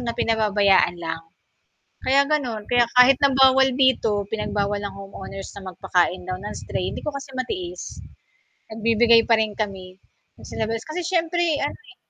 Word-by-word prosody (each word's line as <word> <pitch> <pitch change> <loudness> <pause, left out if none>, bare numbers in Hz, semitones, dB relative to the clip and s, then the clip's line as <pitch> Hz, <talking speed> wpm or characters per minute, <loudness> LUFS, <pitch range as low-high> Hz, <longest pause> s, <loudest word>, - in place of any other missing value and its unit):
na 235 -1 -4
pinababayaan 205 -5 +2
lang, 165 -1 -4 0.9
kaya 275 +2 +5
ganun, 250 -8 -1
kaya 245 -1 +4
kahit 250 +1 +7
na 280 - +5
bawal 265 0 +6
dito 240 -6 +2
pinagbawal 205 -2 -2
ng 200 -1 -6
homeowners 195 0 -9
na 190 -1 -8
magpakain 180 +1 0
daw 185 0 -4
ng 205 +2 -6
stray, 185 - -4
hindi - - -7
ko 300 - -1
kasi 275 0 -8
matiis, 355 +7 -5 0.7
nagbibigay 230 +1 +4
pa 230 - +5
rin 220 -1 0
kami 190 -3 -5 0.4
sa - - -9
labas 225 +1 -3
kasi 315 +3 -4
siyempre 345 -1 0 0.2
ano, - - -2
eh 410 -4 -19
225 Hz, 160 wpm, -22 LUFS, 200-270 Hz, 0.9 s, kahit